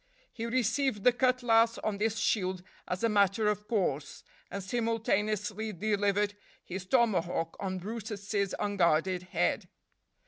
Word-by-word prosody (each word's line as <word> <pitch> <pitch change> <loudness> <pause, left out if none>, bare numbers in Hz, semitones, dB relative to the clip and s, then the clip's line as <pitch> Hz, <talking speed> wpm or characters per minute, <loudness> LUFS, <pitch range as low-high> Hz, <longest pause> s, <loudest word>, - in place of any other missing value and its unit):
He 230 0 -4
received 245 -1 0
the 250 - +7
cutlass 235 -2 +3
on 205 -2 -3
this 220 +1 0
shield 185 -4 0 0.2
as 180 +3 -3
a - - +5
matter 205 0 +3
of 210 0 -2
course, 150 - -1 0.3
and 200 - -5
simultaneously 215 -1 -1
delivered 205 +1 +1 0.3
his 185 0 -6
tomahawk 180 -9 +1
on 190 -1 -2
brutus's 205 -1 -3
unguarded 185 -3 +1
head. 180 - -1
205 Hz, 125 wpm, -30 LUFS, 190-225 Hz, 0.3 s, the